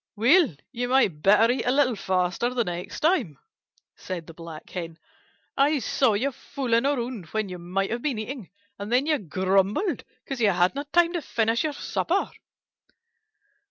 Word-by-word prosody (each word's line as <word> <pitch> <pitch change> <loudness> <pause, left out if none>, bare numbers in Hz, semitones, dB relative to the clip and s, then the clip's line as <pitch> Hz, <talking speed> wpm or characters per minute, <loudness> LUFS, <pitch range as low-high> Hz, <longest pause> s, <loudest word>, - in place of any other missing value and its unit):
"Well, 250 - +4 0.2
you 245 -1 -3
might 240 - +2
better 215 +6 +5
eat 260 - -2
a 245 - +1
little 265 -3 +3
faster 185 +5 0
the 250 -2 0
next 180 0 -6
time," 310 - +1 0.6
said 175 -3 -6
the 165 - -11
Black 165 -1 -10
Hen. 165 -3 -6 0.6
"I 290 +2 +3
saw 260 -2 +2
you 270 +7 0
fooling 255 -1 -1
around 240 - -2
when 215 +2 -2
you 180 -1 -7
might 185 +4 -2
have 235 +1 -2
been 275 -5 -1
eating, 220 -1 -6 0.3
and 205 +2 -6
then 255 +3 +3
you 305 -1 +1
grumbled 195 - 0 0.2
because 265 -2 -5
you 215 - +5
hadn't 200 +11 0
time 345 0 +4
to 345 - -1
finish 230 -2 0
your 310 -2 -1
supper." - - -1
230 Hz, 165 wpm, -25 LUFS, 185-270 Hz, 0.6 s, better